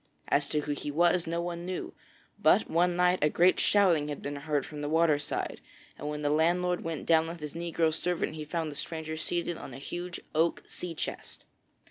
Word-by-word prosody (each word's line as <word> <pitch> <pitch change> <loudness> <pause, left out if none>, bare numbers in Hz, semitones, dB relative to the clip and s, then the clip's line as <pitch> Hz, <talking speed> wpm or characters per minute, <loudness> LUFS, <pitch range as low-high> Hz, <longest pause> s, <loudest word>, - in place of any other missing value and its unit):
As 140 0 +2
to 150 - +1
who 150 - -3
he 145 0 -3
was, 170 +3 +3
no 170 +1 -1
one 170 -1 -4
knew; 185 +1 -4 0.5
but - - +4
one 175 +2 +2
night 180 +1 +3
a 150 - +4
great 175 +4 +4
shouting 175 -8 +4
had 145 -1 -5
been 145 0 -3
heard 145 0 -1
from 150 -1 -7
the 145 - -2
water 160 -2 +3
side, 145 - -3 0.3
and 150 - -5
when 150 0 -4
the 145 - +2
landlord 175 +3 +2
went 165 -2 -4
down 160 -1 +4
with 170 +1 -6
his 150 -2 -6
negro 165 -1 0
servant 170 -1 -1
he 155 -1 -5
found 160 0 -3
the - - -9
stranger 160 +1 -4
seated 170 +1 -2
on 130 - -8
a - - -7
huge 175 +5 -5
oak 160 +2 +1
sea 175 -2 -6
chest. - - -6
165 Hz, 210 wpm, -29 LUFS, 150-175 Hz, 0.5 s, but